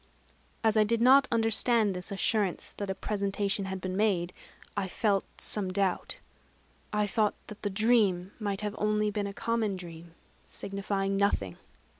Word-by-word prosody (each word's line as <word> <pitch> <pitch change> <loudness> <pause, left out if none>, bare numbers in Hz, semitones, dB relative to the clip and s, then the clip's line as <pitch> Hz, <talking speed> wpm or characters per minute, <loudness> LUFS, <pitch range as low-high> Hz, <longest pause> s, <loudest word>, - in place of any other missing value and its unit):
As 220 -1 +3
I 215 - +6
did 230 +2 +1
not 265 +3 +6
understand 225 -1 +2
this 180 +3 -2
assurance 200 -1 0
that 200 -1 -4
a 190 - -1
presentation 200 0 -1
had 190 0 -4
been 185 0 -4
made, 185 -4 +1 0.4
I 200 -2 -1
felt 200 0 0
some 195 -3 +1
doubt; 190 -1 -1 0.7
I 210 0 +1
thought 210 +1 +1
that 210 - -10
the 205 - -1
dream 200 -3 +2
might 205 -2 -2
have 210 -1 -3
been - - -6
only 210 0 +2
a 200 -1 -2
common 225 -2 -1
dream, 170 -2 -10 0.3
signifying 195 0 -2
nothing. 150 - 0
200 Hz, 155 wpm, -29 LUFS, 190-215 Hz, 0.7 s, I